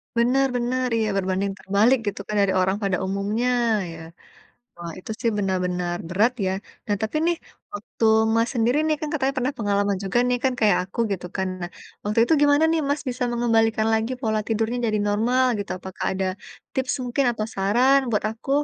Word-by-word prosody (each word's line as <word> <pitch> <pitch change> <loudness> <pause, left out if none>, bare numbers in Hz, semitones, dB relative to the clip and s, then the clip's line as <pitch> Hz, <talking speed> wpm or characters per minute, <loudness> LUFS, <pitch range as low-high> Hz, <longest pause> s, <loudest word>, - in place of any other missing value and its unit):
Benar 250 +4 +3
benar, 250 +1 0
iya 220 -1 +1
berbanding 190 +1 0
terbalik 210 +7 +3
gitu 205 - -2
kan 210 - -3
dari 195 -1 +2
orang 190 +2 +1
pada 195 -2 +1
umumnya, 200 +5 -1 0.4
ya. 165 - -9 0.8
Wah 170 -1 -7
itu 185 - -10
sih 235 - +1
benar-benar 180 -3 -1
berat 210 +7 +2
ya. - - +1 0.4
Nah 205 - 0
tapi 220 +7 -2
nih, 345 0 +2 0.4
waktu 205 +2 -5 0.3
Mas 230 +1 +2
sendiri 240 +4 +2
nih 310 -1 +2
kan 305 - -3
katanya 275 -3 0
pernah 260 +3 -1
pengalaman 200 -2 +1
juga 195 +5 0
nih 250 0 +1
kan 265 - +3
kayak 210 -4 +4
aku 185 - -16
gitu 180 -2 -4
kan. 190 -1 -1
Nah, 175 - -4 0.4
waktu 210 +2 -1
itu 280 - 0
gimana 290 +2 +5
nih 325 - +2
Mas 285 +1 0
bisa 250 0 -2
mengembalikan 225 -2 +2
lagi 220 +3 0
pola 220 -2 +1
tidurnya 225 +2 0
jadi 215 -1 +1
normal 235 +5 +2
gitu. 205 - -5
Apakah 190 0 -7
ada 190 0 -1 0.5
tips 260 -1 0
mungkin 250 +3 0
atau 215 -2 -3
saran 240 +8 +4
buat 210 - 0
aku? 225 +4 -9
220 Hz, 185 wpm, -23 LUFS, 195-245 Hz, 0.8 s, gimana